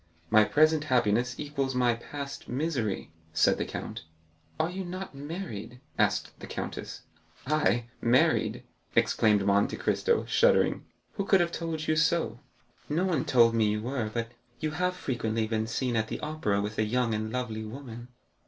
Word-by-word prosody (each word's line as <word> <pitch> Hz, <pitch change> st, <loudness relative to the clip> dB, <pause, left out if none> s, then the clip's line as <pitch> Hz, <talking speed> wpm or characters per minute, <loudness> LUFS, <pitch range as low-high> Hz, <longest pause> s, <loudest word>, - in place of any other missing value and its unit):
"My 110 Hz, 0 st, +7 dB
present 155 Hz, +4 st, +3 dB
happiness 125 Hz, -2 st, +1 dB
equals 140 Hz, -3 st, -2 dB
my 125 Hz, -1 st, +3 dB
past 140 Hz, +4 st, -7 dB
misery," 125 Hz, -, -2 dB, 0.2 s
said -, -, +3 dB
the -, -, 0 dB
count. -, -, -6 dB, 0.6 s
"Are 160 Hz, +2 st, +1 dB
you 190 Hz, +1 st, -4 dB
not 185 Hz, 0 st, -6 dB
married?" 135 Hz, -, -6 dB, 0.2 s
asked -, -, +1 dB
the -, -, -8 dB
countess. -, -, -5 dB, 0.4 s
"I, 120 Hz, -6 st, +2 dB, 0.2 s
married?" 120 Hz, +2 st, +3 dB, 0.3 s
exclaimed 105 Hz, -3 st, +3 dB
Monte 100 Hz, 0 st, +2 dB
Cristo, 470 Hz, -1 st, +1 dB
shuddering; -, -, +3 dB, 0.3 s
"who 200 Hz, -, -1 dB
could 195 Hz, -1 st, +5 dB
have 170 Hz, -1 st, +1 dB
told 160 Hz, -2 st, -3 dB
you 155 Hz, -, +3 dB
so?" 160 Hz, -7 st, +1 dB, 0.5 s
"No 165 Hz, +5 st, +1 dB
one 165 Hz, -8 st, 0 dB
told 115 Hz, -2 st, +5 dB
me 110 Hz, -2 st, +3 dB
you 105 Hz, +1 st, -1 dB
were, 120 Hz, -3 st, -2 dB
but 115 Hz, 0 st, -3 dB, 0.3 s
you 155 Hz, +2 st, -1 dB
have 180 Hz, +3 st, 0 dB
frequently 115 Hz, -8 st, -1 dB
been 110 Hz, 0 st, -1 dB
seen 120 Hz, +1 st, -1 dB
at 110 Hz, -1 st, +1 dB
the -, -, -4 dB
Opera 150 Hz, -10 st, -1 dB
with 105 Hz, +1 st, -4 dB
a -, -, +4 dB
young 120 Hz, +1 st, +1 dB
and 110 Hz, 0 st, -2 dB
lovely 115 Hz, -3 st, -3 dB
woman." 120 Hz, 0 st, -8 dB
125 Hz, 160 wpm, -29 LUFS, 110-155 Hz, 0.6 s, My